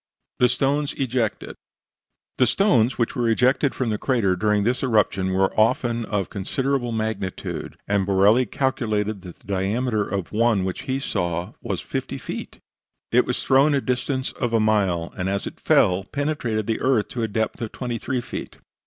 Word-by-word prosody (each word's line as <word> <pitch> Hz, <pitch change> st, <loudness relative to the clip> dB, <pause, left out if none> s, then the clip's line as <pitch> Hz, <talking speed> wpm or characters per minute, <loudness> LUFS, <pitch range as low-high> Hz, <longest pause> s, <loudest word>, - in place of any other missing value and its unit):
THE 125 Hz, -, +5 dB
STONES 140 Hz, +3 st, +1 dB
EJECTED 125 Hz, -4 st, -1 dB, 0.9 s
The 125 Hz, -, +5 dB
stones 130 Hz, -, +3 dB
which 115 Hz, -, 0 dB
were 120 Hz, -2 st, +1 dB
ejected 130 Hz, +4 st, +2 dB
from 125 Hz, -4 st, -1 dB
the 105 Hz, -, -2 dB
crater 115 Hz, -8 st, +1 dB
during 105 Hz, +2 st, +1 dB
this 125 Hz, +4 st, 0 dB
eruption 105 Hz, -6 st, +1 dB
were 95 Hz, +1 st, +2 dB
often 115 Hz, +1 st, +2 dB
of 100 Hz, -4 st, -2 dB
considerable 125 Hz, +5 st, -1 dB
magnitude, 110 Hz, -4 st, -4 dB
and 100 Hz, -1 st, +2 dB
Borelli 100 Hz, +6 st, +4 dB
calculated 110 Hz, -6 st, -1 dB
that 90 Hz, -1 st, -11 dB
the -, -, -28 dB
diameter 105 Hz, +4 st, 0 dB
of 100 Hz, -3 st, -4 dB
one 110 Hz, -2 st, +2 dB
which 95 Hz, -, -3 dB
he 130 Hz, +1 st, 0 dB
saw 85 Hz, -9 st, -2 dB
was -, -, -3 dB
50 -, -, -4 dB
feet; -, -, -7 dB, 0.5 s
it -, -, +4 dB
was -, -, 0 dB
thrown 140 Hz, +3 st, +4 dB
to -, -, +3 dB
a -, -, 0 dB
distance 130 Hz, +1 st, -1 dB
of 120 Hz, -1 st, -3 dB
a 115 Hz, -, +4 dB
mile, 100 Hz, -6 st, +1 dB
and 90 Hz, +1 st, -2 dB
as 100 Hz, 0 st, -1 dB
it -, -, -7 dB
fell 90 Hz, 0 st, +4 dB
it 100 Hz, -, -13 dB
penetrated 140 Hz, -7 st, -1 dB
the 110 Hz, 0 st, -1 dB
earth 120 Hz, -6 st, +2 dB
to 120 Hz, -, -4 dB
a 115 Hz, -, +1 dB
depth 110 Hz, +2 st, -2 dB
of 115 Hz, -, -3 dB
23 125 Hz, +1 st, -3 dB
feet. -, -, -7 dB
110 Hz, 180 wpm, -23 LUFS, 100-130 Hz, 0.9 s, THE